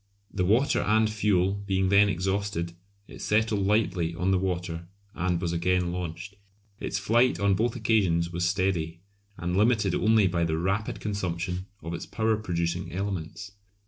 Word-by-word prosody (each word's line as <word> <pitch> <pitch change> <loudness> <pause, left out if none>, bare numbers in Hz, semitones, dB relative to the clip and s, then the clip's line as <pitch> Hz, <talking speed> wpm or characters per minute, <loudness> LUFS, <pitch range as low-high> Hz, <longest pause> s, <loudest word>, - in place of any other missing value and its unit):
The 95 - 0
water 115 +9 +3
and 110 +1 +3
fuel 100 -3 +1
being 95 -1 +1
then 100 +1 +5
exhausted 95 -2 -2 0.3
it - - -11
settled 105 -2 +1
lightly 90 -6 +1
on 90 +2 0
the 95 - +3
water 90 -2 -3 0.3
and 90 -1 0
was 85 -1 -2
again 90 +1 +1
launched. 90 +3 -6 0.4
Its - - -2
flight 120 +5 +2
on 100 -1 +3
both 115 +5 0
occasions 95 -8 +1
was 85 0 -2
steady, 85 -2 0 0.4
and 90 +1 -2
limited 105 -2 +3
only 110 0 +4
by 90 -2 +1
the 80 -1 0
rapid 95 +5 -1
consumption 95 -2 -3 0.2
of 85 +1 -5
its 85 - -5
power 110 0 +1
producing 85 -3 -2
elements. 95 0 -4
95 Hz, 155 wpm, -27 LUFS, 85-105 Hz, 0.4 s, then